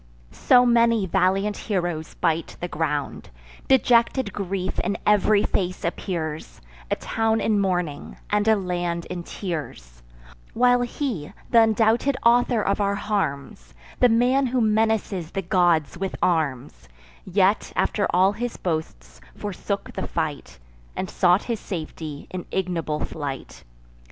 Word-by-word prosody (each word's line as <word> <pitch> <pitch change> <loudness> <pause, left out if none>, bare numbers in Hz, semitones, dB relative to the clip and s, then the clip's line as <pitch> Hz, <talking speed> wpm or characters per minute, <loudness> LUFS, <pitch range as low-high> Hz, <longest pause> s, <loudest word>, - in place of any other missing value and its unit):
So 250 - +4
many 230 -3 +3
valiant 195 +3 +1
heroes 175 -6 -3
bite 165 0 -1
the 175 - -3
ground; 150 -3 -3 0.4
Dejected 240 -3 +3
grief 190 -1 -3
in 200 - -1
ev'ry 210 0 +4
face 180 -2 -2
appears; 165 -3 -4 0.3
A - - +1
town 225 0 0
in 215 -2 +1
mourning, 180 -7 -2
and 210 +1 +1
a 220 - +6
land 175 -3 -2
in 180 -1 -4
tears; 145 - -6 0.5
While 245 +1 +4
he, 240 - -3 0.2
th' - - -2
undoubted 225 +4 +4
author 240 -1 +4
of 200 +1 0
our 200 0 +1
harms, 140 - -3 0.2
The 250 - +6
man 250 +4 +3
who 250 +1 0
menaces 215 -5 +1
the 195 - -4
gods 175 -4 +2
with 195 0 -3
arms, 140 - -1 0.3
Yet, 195 +2 +1
after 205 - +1
all 185 +2 +4
his 240 +3 -4
boasts, 65 - -4
forsook - - -4
the - - -4
fight, - - -4 0.4
And 185 - -4
sought 180 +2 +3
his 230 -3 -3
safety 155 -4 -6
in 185 -1 -6
ignoble 170 -5 -2
flight. 140 -3 -7
190 Hz, 130 wpm, -24 LUFS, 165-220 Hz, 0.5 s, a